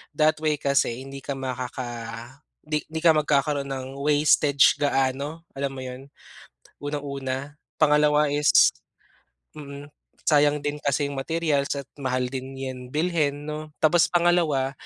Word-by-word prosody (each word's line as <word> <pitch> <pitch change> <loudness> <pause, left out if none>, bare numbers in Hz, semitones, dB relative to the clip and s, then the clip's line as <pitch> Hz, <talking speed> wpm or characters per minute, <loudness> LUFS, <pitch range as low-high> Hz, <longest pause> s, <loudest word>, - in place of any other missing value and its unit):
That 155 +1 +3
way 155 -1 +2
kasi 140 -3 0
hindi 135 0 -8
ka 140 +1 -4
makaka, 130 -1 -4 0.8
di 150 0 -1
di 160 +1 -4
ka 170 - +7
magkakaroon 145 -2 +1
ng 130 -1 -4
wastage 145 -1 +4
gaano. 140 +3 -1
Alam 140 0 -3
mo 130 - -6
yun? 130 +1 -8 0.7
Unang 145 0 -4
una. 135 -2 -3 0.4
Pangalawa 150 -1 +4
is 145 0 +5 0.9
mm, 140 0 -9 0.3
sayang 145 -1 +3
din 145 0 -2
kasi 140 0 0
yung 140 - -4
materials 150 -1 0
at 140 - -5
mahal 130 -2 -1
din 135 0 -6
yan 130 -1 -6
bilhin 150 -1 0
no. 150 0 -7
Tapos 165 +2 +5
pangalawa, 170 -6 +2
145 Hz, 135 wpm, -25 LUFS, 135-150 Hz, 0.9 s, ka